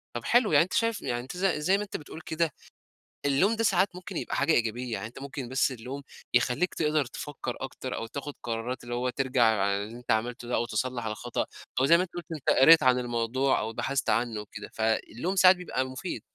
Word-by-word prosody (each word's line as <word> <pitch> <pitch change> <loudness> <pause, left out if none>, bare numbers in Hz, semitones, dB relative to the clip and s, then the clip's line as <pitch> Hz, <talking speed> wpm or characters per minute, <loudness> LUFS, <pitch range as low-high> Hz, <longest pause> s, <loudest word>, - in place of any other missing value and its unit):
طب 120 - -3
حلو، 235 -4 +4
يعني 150 +1 +6
أنت 180 - -7
شايف 230 -2 +1
يعني 120 -1 -2
أنت 135 +8 -8
ز 195 - 0
زي 185 +2 +2
ما 210 - -2
أنت 205 - -5
بتقول 160 +2 -10
كده، 160 -2 -1 0.7
اللوم 180 +11 +3
ده 225 - -1
ساعات 190 -3 +2
ممكن 180 0 -7
يبقى - - -3
حاجة 145 +3 +2
إيجابية، 120 +1 0
يعني 110 +1 -3
أنت 120 - -12
ممكن 135 -3 -6
بس 135 +1 +2
اللوم 130 +3 -6 0.3
يخليك 125 +8 +2
تقدر 150 -3 +1
تفكّر 130 0 -6
أكتر 130 -1 -5
أو 115 - -4
تاخد 140 +4 -6
قرارات 120 +2 -3
اللي 120 0 -4
هو 125 +1 0
ترجع 130 -1 +1
عن 105 -3 +3
اللي 100 +3 -3
أنت 125 - -4
عملته 120 +2 -1
ده 125 - 0
أو 120 - +1
تصلح 120 +1 -2
الخطأ، 110 +3 -2 0.3
أو 130 - +4
زي 170 +4 +7
ما 180 - +2
أنت 185 - -9
قلت، 175 - -5
أنت 155 -5 -2
قريت 160 +5 +8
عن 125 -1 +4
الموضوع 120 +2 0
أو 110 +1 -3
بحثت 135 -1 -1
عنّه 115 -1 +1
وكده. 105 0 -9
فاللوم 110 - -1
ساعات 185 0 +7
بيبقى 175 -8 -2
مفيد. 130 0 -5
130 Hz, 220 wpm, -28 LUFS, 120-160 Hz, 0.7 s, قريت